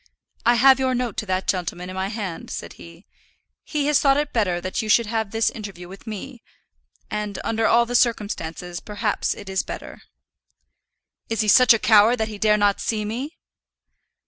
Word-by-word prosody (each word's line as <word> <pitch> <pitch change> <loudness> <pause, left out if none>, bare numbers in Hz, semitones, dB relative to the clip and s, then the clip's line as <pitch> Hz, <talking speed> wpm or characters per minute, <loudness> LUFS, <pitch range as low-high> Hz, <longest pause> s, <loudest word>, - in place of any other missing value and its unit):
"I 240 - +6
have 265 +2 +6
your 260 -1 +1
note 245 -3 -2
to 215 - -3
that 185 0 -1
gentleman 180 -1 -2
in - - -8
my 190 0 -2
hand," 200 -5 -6
said - - -6
he. 170 +3 -14 0.6
"He 295 -2 -2
has 295 -1 +3
thought 275 -1 +3
it 295 0 -2
better 185 -7 +1
that 185 +1 -3
you 220 - -5
should 235 +2 +4
have 220 -1 -2
this 225 +2 +1
interview 195 -5 -8
with 195 +5 -13
me; 225 +4 -7 0.7
and 210 -1 -3
under 225 0 0
all 235 +1 +4
the 240 - -6
circumstances 180 -7 -1
perhaps 210 0 -2
it 200 - -11
is 190 -1 0
better." - - -9 1.3
"Is 225 0 0
he 215 - -1
such 250 +5 +7
a 230 - +7
coward 220 +1 +5
that 220 -2 -2
he 210 -2 -8
dare 210 0 +3
not 205 -1 +2
see 215 -2 -2
me?" 260 +10 -5
215 Hz, 190 wpm, -23 LUFS, 195-235 Hz, 1.3 s, such